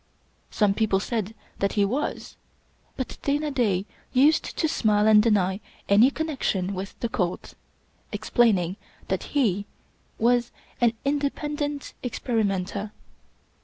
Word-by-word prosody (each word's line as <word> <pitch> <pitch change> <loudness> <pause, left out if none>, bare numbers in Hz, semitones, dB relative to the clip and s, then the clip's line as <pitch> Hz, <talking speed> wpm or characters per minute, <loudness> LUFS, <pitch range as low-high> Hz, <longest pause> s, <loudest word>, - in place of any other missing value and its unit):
Some 205 -2 +2
people 205 -2 +1
said 220 0 -3 0.2
that 200 - 0
he 205 -1 +3
was; 255 +9 -3 0.6
but 260 - -5
Dana 295 +1 0
Da 205 -8 +1 0.3
used 290 +5 +3
to 320 - +2
smile 210 -8 +2
and 215 -1 +7
deny 200 -4 +2 0.3
any 210 +6 +6
connection 270 - -2
with 195 +1 -6
the 235 - +1
cult; 180 -6 -3 0.6
ex - - -6
plaining 195 -7 +3 0.3
that - - 0 0.2
he 205 -6 +1 0.5
was 240 +1 +2 0.3
an 235 -1 +4
" - - -36
independent 290 0 -2
experimenter. 210 -4 -2
220 Hz, 125 wpm, -25 LUFS, 200-270 Hz, 0.6 s, and